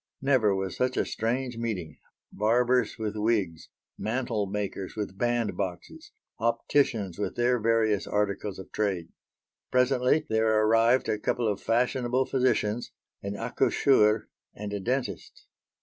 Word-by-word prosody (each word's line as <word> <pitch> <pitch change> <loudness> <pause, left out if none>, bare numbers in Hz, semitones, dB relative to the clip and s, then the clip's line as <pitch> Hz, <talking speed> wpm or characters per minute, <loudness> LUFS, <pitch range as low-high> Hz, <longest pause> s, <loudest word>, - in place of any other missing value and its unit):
Never 130 -7 +3
was 95 -1 -3
such 125 0 0
a - - +2
strange 125 +2 -2
meeting: 95 -10 -4 0.3
barbers 125 +4 +2
with 110 -2 -3
wigs; 105 -7 -1 0.3
mantlemakers 105 -4 -2
with 105 -3 -4
band 120 0 0
boxes; 90 -3 -6 0.3
opticians 115 -4 0
with 105 - -2
their 120 +1 +2
various 110 -2 +1
articles 100 -1 -1
of 95 - -10
trade. 95 -6 -1 0.6
Presently 125 +3 +2
there 110 0 +2
arrived 115 +3 +4
a 105 - 0
couple 120 +2 0
of 105 -2 -1
fashionable 125 +2 +1
physicians, 120 -4 0 0.3
an 100 0 -4
accoucheur, 115 -2 +2 0.3
and 105 0 -6
a 100 - -2
dentist. 120 -3 -3
110 Hz, 125 wpm, -27 LUFS, 100-125 Hz, 0.6 s, arrived